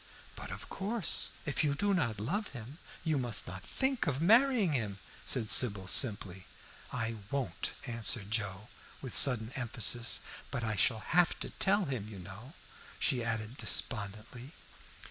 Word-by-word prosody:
"But -, -, -7 dB
of -, -, -7 dB
course, 205 Hz, +1 st, -1 dB, 0.2 s
if 150 Hz, +1 st, 0 dB
you 145 Hz, -2 st, +1 dB
do 200 Hz, +6 st, +1 dB
not 115 Hz, -, 0 dB
love 195 Hz, -, -2 dB
him, 125 Hz, +8 st, -10 dB, 0.2 s
you 155 Hz, -4 st, +1 dB
must 120 Hz, -4 st, +2 dB
not 95 Hz, +1 st, -6 dB
think 265 Hz, -, -1 dB
of 140 Hz, -2 st, 0 dB
marrying 225 Hz, -, +4 dB
him," 105 Hz, -7 st, -2 dB, 0.3 s
said 120 Hz, -5 st, +2 dB
Sybil, 105 Hz, -5 st, +3 dB
simply. 95 Hz, -3 st, +1 dB, 0.4 s
"I 115 Hz, -2 st, -3 dB
won't," 140 Hz, -1 st, -2 dB
answered 115 Hz, -3 st, +1 dB
Joe, 100 Hz, -1 st, -2 dB, 0.3 s
with 130 Hz, -, -4 dB
sudden 120 Hz, -4 st, +6 dB
emphasis. 120 Hz, -2 st, +1 dB, 0.3 s
"But 130 Hz, -4 st, -4 dB
I 110 Hz, -1 st, -1 dB
shall 110 Hz, +2 st, +2 dB
have 175 Hz, +6 st, +2 dB
to -, -, -5 dB
tell 200 Hz, 0 st, +2 dB
him, 130 Hz, -8 st, -4 dB
you 105 Hz, -2 st, -9 dB
know," 100 Hz, -, -11 dB, 0.4 s
she 125 Hz, -5 st, +1 dB
added 115 Hz, +1 st, -3 dB
despondently. 110 Hz, -, -2 dB
120 Hz, 150 wpm, -32 LUFS, 110-150 Hz, 0.4 s, sudden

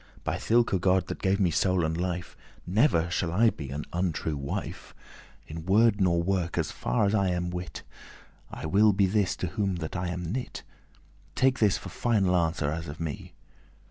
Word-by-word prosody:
By -, -, -1 dB
thilke* 115 Hz, -4 st, +2 dB
God 95 Hz, 0 st, +3 dB
that -, -, -5 dB
gave 95 Hz, +1 st, +1 dB
me 90 Hz, -4 st, +2 dB
soul 90 Hz, +1 st, +2 dB
and 80 Hz, +1 st, -1 dB
life, 90 Hz, 0 st, -3 dB, 0.3 s
*that 90 Hz, -, -7 dB
Never 90 Hz, -, +3 dB
shall 85 Hz, -2 st, -1 dB
I 110 Hz, +6 st, +4 dB
be 70 Hz, -3 st, -8 dB
an 70 Hz, +3 st, -5 dB
untrue 85 Hz, -3 st, -1 dB
wife 70 Hz, 0 st, -5 dB, 0.5 s
In 80 Hz, +1 st, -7 dB
word 105 Hz, +1 st, +4 dB
nor 85 Hz, -2 st, +3 dB
work, 90 Hz, -2 st, -1 dB
as 80 Hz, -3 st, 0 dB
far -, -, 0 dB
as 100 Hz, -, +1 dB
I 100 Hz, -3 st, +2 dB
have 90 Hz, 0 st, -2 dB
wit; 85 Hz, -5 st, -6 dB, 0.7 s
I -, -, -7 dB
will 105 Hz, +6 st, +4 dB
be 100 Hz, 0 st, +3 dB
his 100 Hz, 0 st, +1 dB
to 90 Hz, -, -3 dB
whom 100 Hz, -3 st, -1 dB
that 80 Hz, -1 st, -5 dB
I 90 Hz, -1 st, -2 dB
am 90 Hz, -1 st, -4 dB
knit; 125 Hz, +3 st, -4 dB, 0.7 s
Take 130 Hz, 0 st, +2 dB
this 105 Hz, -4 st, +3 dB
for -, -, -8 dB
final 100 Hz, -6 st, +1 dB
answer 80 Hz, -4 st, +1 dB
as 80 Hz, +1 st, -4 dB
of 75 Hz, -, -8 dB
me." 80 Hz, -3 st, -6 dB
90 Hz, 195 wpm, -28 LUFS, 80-100 Hz, 0.7 s, I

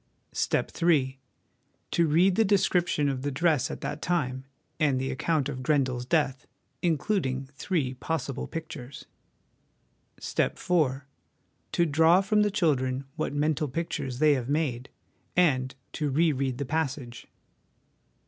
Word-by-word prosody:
" -, -, -44 dB
Step -, -, 0 dB
III. 135 Hz, -6 st, +2 dB, 0.7 s
To 170 Hz, -2 st, +3 dB
read 175 Hz, +5 st, +4 dB
the 225 Hz, -, +3 dB
description 180 Hz, -6 st, +2 dB
of 135 Hz, -2 st, -1 dB
the 145 Hz, -, -1 dB
dress 150 Hz, 0 st, +1 dB
at -, -, -6 dB
that 150 Hz, -, -4 dB
time, 135 Hz, -7 st, -1 dB, 0.3 s
and 140 Hz, -4 st, +2 dB
the 135 Hz, +1 st, -2 dB
account 150 Hz, +1 st, 0 dB
of 130 Hz, -, -5 dB
Grendel's 130 Hz, -3 st, 0 dB
death 135 Hz, -4 st, 0 dB, 0.3 s
(includ 175 Hz, +1 st, +1 dB
ing 130 Hz, +1 st, -3 dB
three 140 Hz, -4 st, -1 dB
possible 145 Hz, -1 st, -3 dB
pictures). 150 Hz, -5 st, -7 dB, 0.6 s
" -, -, -43 dB, 0.3 s
Step -, -, 0 dB
IV. 150 Hz, -7 st, +1 dB, 0.7 s
To 170 Hz, -, +3 dB
draw 160 Hz, +4 st, +5 dB
from 210 Hz, +2 st, +2 dB
the 210 Hz, -, +3 dB
children 135 Hz, -9 st, 0 dB
what 155 Hz, -, -2 dB
mental 150 Hz, 0 st, +1 dB
pictures 135 Hz, -3 st, -3 dB
they 150 Hz, +2 st, +5 dB
have 130 Hz, -2 st, -2 dB
made 140 Hz, -5 st, -1 dB, 0.5 s
and 130 Hz, -7 st, +2 dB, 0.2 s
to 150 Hz, -2 st, -1 dB
re 160 Hz, +4 st, +3 dB
read 130 Hz, -2 st, -2 dB
the 140 Hz, -, -3 dB
passage. 130 Hz, -6 st, -3 dB
145 Hz, 145 wpm, -27 LUFS, 130-165 Hz, 0.7 s, draw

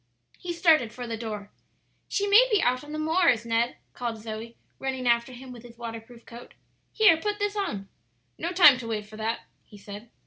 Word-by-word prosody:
He 355 Hz, -, -5 dB
started 320 Hz, -9 st, +3 dB
for 245 Hz, +1 st, -7 dB
the 230 Hz, -1 st, -4 dB
door. 210 Hz, -3 st, -6 dB, 0.6 s
"She 405 Hz, -, -1 dB
may 420 Hz, +5 st, +6 dB
be 420 Hz, -, +4 dB
out 255 Hz, -3 st, +1 dB
on 295 Hz, -, -10 dB
the 305 Hz, -, -4 dB
moors, 315 Hz, -7 st, +2 dB
Ned," 230 Hz, +1 st, 0 dB, 0.2 s
called 235 Hz, -2 st, -4 dB
Zoe, 220 Hz, +1 st, -8 dB, 0.2 s
running 265 Hz, -1 st, -3 dB
after 235 Hz, +1 st, +2 dB
him 255 Hz, +1 st, -10 dB
with 240 Hz, -2 st, -10 dB
his 235 Hz, 0 st, -14 dB
waterproof 230 Hz, 0 st, -9 dB
coat. 235 Hz, +1 st, -12 dB, 0.4 s
"Here, 420 Hz, -7 st, +5 dB
put 415 Hz, +5 st, -2 dB
this 410 Hz, 0 st, -2 dB
on." 275 Hz, -, -3 dB, 0.5 s
"No 340 Hz, -, -3 dB
time 340 Hz, -8 st, +7 dB
to 230 Hz, -, -7 dB
wait 215 Hz, -2 st, -3 dB
for 215 Hz, +1 st, -13 dB
that," 225 Hz, +1 st, -2 dB, 0.2 s
he 210 Hz, -, -16 dB
said. 205 Hz, +3 st, -10 dB
240 Hz, 200 wpm, -26 LUFS, 225-325 Hz, 0.6 s, time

